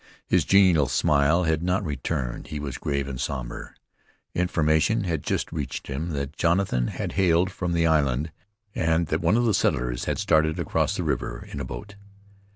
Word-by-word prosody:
His - - +2
genial 90 -8 +5
smile 75 +4 +3
had 80 -1 +1
not 90 +2 0
returned; 65 -4 -3
he 75 - -5
was 70 -3 -5
grave 70 -1 -2
and 65 -2 -5
somber. 65 -3 -5 0.6
Information 80 +3 +2
had 85 -5 -1
just - - -2
reached - - -4
him 75 +6 -4
that 70 0 -4
Jonathan 85 -8 +1
had - - -4
hailed 90 -1 +2
from 90 -1 -3
the 85 -1 +2
island, 75 -1 +1 0.4
and 80 0 +1
that 80 - 0
one 85 +7 +3
of 120 - +2
the 110 - +2
settlers 60 -7 0
had - - -1
started 80 0 +2
across - - 0
the - - -1
river - - -3
in - - -5
a 70 - -3
boat. 100 +10 -8
80 Hz, 175 wpm, -25 LUFS, 70-90 Hz, 0.6 s, genial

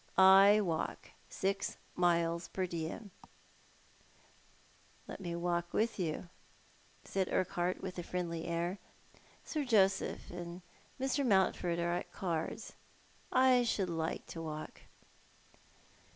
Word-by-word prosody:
I 195 +2 +8
walk 165 -5 -3 0.2
six 195 +1 -1 0.2
miles 170 -1 +2
per 185 - -2
diem." 175 +4 -5 2.0
"Let - - -7
me 170 -2 -3
walk 175 0 -1
with 225 -1 +1
you," 170 0 -2 0.7
said 190 -1 -1
Urquhart, 180 0 0
with 185 -1 -5
a - - -1
friendly 170 -2 -3
air. 170 +3 -2 0.3
" - - -30 0.3
Sir 305 -2 -2
Joseph 195 -6 +2
and 175 0 -7 0.4
Mr. 270 +2 +1
Mountford 190 -6 +2
are 170 0 0
at 175 - -3
cards. 180 +4 -3 0.6
I 255 -1 +5
should 195 -6 0
like 165 +1 -3
a 165 - -4
walk." 155 -1 -6
180 Hz, 115 wpm, -34 LUFS, 170-195 Hz, 2.0 s, I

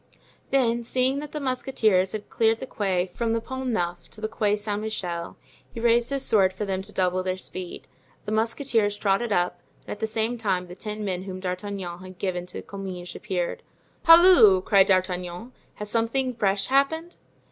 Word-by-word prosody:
Then 235 -3 +2
seeing 255 +3 0
that 295 0 -7
the 300 - -4
musketeers 240 -8 +1
had 215 -1 -5
cleared 225 0 +2
the - - -5
Quai 190 -7 -1
from 225 +5 -2
the 230 - +1
Pont 260 +3 -5
Neuf 175 -6 -2
to - - -6
the 215 - -2
Quai 215 -2 +1
Saint 205 0 -3
Michael, 175 -6 -4 0.3
he - - -7
raised 235 0 +3
his 275 -1 -1
sword 195 -6 +3
for 205 +3 -4
them 190 -1 -2
to 200 +2 -8
double 185 -1 +1
their 185 0 -2
speed. 185 -1 -7 0.4
The 210 - -4
musketeers 225 -1 +1
trotted 205 +3 +1
up, 175 -2 0 0.2
and - - -8
at 205 - -5
the 220 - -1
same 225 +2 -1
time 190 -5 0
the 175 - -10
ten 210 +3 -5
men 185 -1 -3
whom 185 -1 -6
D'Artagnan 185 -1 -4
had 185 0 -11
given 180 -2 -3
to 180 - -6
Comminges 185 -3 -7
appeared. 185 -4 -3 0.4
"Halloo!" 330 - +8
cried 195 -1 +5
D'Artagnan; 185 +3 -1 0.2
"has 210 0 -6
something 250 +3 0
fresh 200 -3 +1
happened?" 320 +6 +1
210 Hz, 185 wpm, -25 LUFS, 185-235 Hz, 0.4 s, Halloo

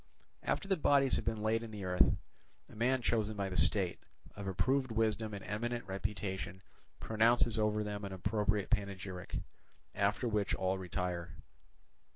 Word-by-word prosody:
After 195 - -1
the 195 -1 +2
bodies 140 -3 +4
have - - -4
been 110 -2 -1
laid 110 +1 +2
in 115 - -6
the 105 -2 -6
earth, 90 0 +4 0.5
a - - -15
man 125 +3 +1
chosen 110 -2 +1
by 100 -1 -1
the 90 - -5
state, 95 -1 +3 0.4
of 100 -1 -6
approved 130 +8 +1
wisdom 110 -1 +1
and 100 - -7
eminent 120 +4 -2
reputation, 95 -1 -3 0.4
pronounces 115 +1 +3
over 105 0 +2
them 105 0 -4
an 100 - -4
appropriate 105 +2 0
panegyric; 100 -4 -2 0.6
after 100 +5 +1
which 105 -3 +1
all 95 0 0
retire. 90 -2 -3
105 Hz, 155 wpm, -34 LUFS, 95-115 Hz, 0.6 s, bodies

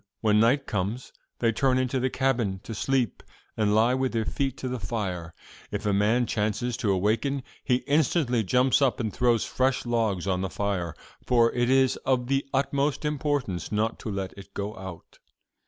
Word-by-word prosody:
When 105 -1 +4
night 120 +6 +3
comes, 105 +5 -3 0.2
they 115 -1 +2
turn 130 +3 +2
into 130 0 0
the 130 +1 +1
cabin 120 -8 0
to 115 - -6
sleep, 130 +1 0 0.3
and 105 -1 +2
lie 115 +3 +4
with 130 -1 0
their 115 -1 0
feet 135 +1 -2
to 130 - -4
the 125 -1 -3
fire. 95 -5 -4 0.3
If - - -4
a 105 - +2
man 110 +5 +3
chances 110 +2 -1
to 110 -5 0
awaken, 115 +8 0 0.2
he 125 -1 +1
instantly 140 -4 +2
jumps 125 +7 +3
up 130 -7 +2
and 110 -4 -2
throws 120 -3 +2
fresh 130 0 0
logs 110 -7 0
on 95 -2 0
the 95 - -2
fire; 90 -3 -2 0.3
for 120 -2 +4
it 120 0 +1
is 130 -1 +4
of 130 -2 0
the 135 0 +2
utmost 140 +2 0
importance 145 - -1
not 110 +1 0
to - - -5
let 100 -2 -3
it 100 -1 -13
go 100 +1 -3
out. 95 -3 -10
120 Hz, 185 wpm, -26 LUFS, 105-130 Hz, 0.3 s, When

